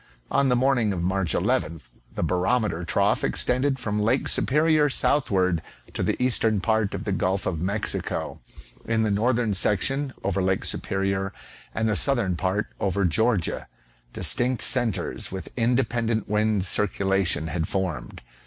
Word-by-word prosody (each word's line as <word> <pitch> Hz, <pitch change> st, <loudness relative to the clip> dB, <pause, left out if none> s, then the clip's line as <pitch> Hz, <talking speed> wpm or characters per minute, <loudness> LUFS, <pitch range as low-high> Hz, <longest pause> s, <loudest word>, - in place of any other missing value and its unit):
On 140 Hz, -1 st, +3 dB
the 125 Hz, -, +3 dB
morning 120 Hz, -4 st, +2 dB
of 85 Hz, -2 st, -3 dB
Mai'ch 95 Hz, -2 st, 0 dB
11th 80 Hz, 0 st, -1 dB, 0.3 s
the -, -, -1 dB
bar 90 Hz, +2 st, 0 dB
ometer 110 Hz, -9 st, +1 dB
trough 85 Hz, -, +1 dB
extended 130 Hz, +2 st, 0 dB
from 105 Hz, -4 st, -2 dB
Lake 115 Hz, +6 st, +1 dB
Superior 150 Hz, +1 st, +2 dB
southward 95 Hz, -, +1 dB, 0.3 s
to -, -, -3 dB
the -, -, +1 dB
eastern 115 Hz, -4 st, +2 dB
part 110 Hz, 0 st, 0 dB
of -, -, -5 dB
the -, -, -2 dB
Gulf 95 Hz, +1 st, 0 dB
of 80 Hz, -3 st, -2 dB
Mexico; 100 Hz, +4 st, -3 dB, 0.5 s
in 110 Hz, -1 st, +1 dB
the 110 Hz, -, +1 dB
northern 115 Hz, +1 st, +1 dB
section 130 Hz, +9 st, +1 dB
over 100 Hz, -1 st, 0 dB
Lake 95 Hz, 0 st, 0 dB
Superior, 95 Hz, 0 st, -2 dB, 0.4 s
and 110 Hz, -, 0 dB
the 105 Hz, -, +1 dB
southern 115 Hz, -5 st, +2 dB
part, 95 Hz, +4 st, -1 dB
over 100 Hz, 0 st, 0 dB
Georgia, 110 Hz, +2 st, 0 dB, 0.4 s
distinct 125 Hz, 0 st, +1 dB
centres, 120 Hz, -6 st, -1 dB
with 95 Hz, 0 st, -7 dB
independent 120 Hz, -2 st, 0 dB
wind 105 Hz, -2 st, +1 dB
circulation, 95 Hz, -4 st, +1 dB
had 80 Hz, +1 st, -2 dB
foi'med. 95 Hz, -9 st, -3 dB
105 Hz, 145 wpm, -25 LUFS, 95-120 Hz, 0.5 s, On